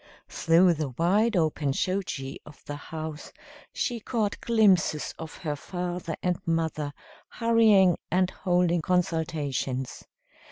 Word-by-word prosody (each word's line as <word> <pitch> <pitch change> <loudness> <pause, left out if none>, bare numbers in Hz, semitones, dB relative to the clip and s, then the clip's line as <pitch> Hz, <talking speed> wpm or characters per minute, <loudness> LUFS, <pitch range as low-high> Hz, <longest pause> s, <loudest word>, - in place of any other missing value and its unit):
Through 170 +2 +4
the 155 -3 -3
wide 190 - +2
open 155 -4 +1
shoji 170 -7 -2
of 150 - -16
the 145 - -5
house 155 +1 -7 0.4
she 240 -2 -2
caught 215 -2 -2
glimpses 195 -9 +3
of 160 -1 -7
her 150 -3 -3
father 175 +1 -4
and 180 -1 0
mother 160 -3 -1 0.4
hurrying 220 -6 +4
and 185 +1 +2
holding 175 -2 +1
consultations. 155 -7 -1
170 Hz, 115 wpm, -27 LUFS, 155-185 Hz, 0.4 s, Through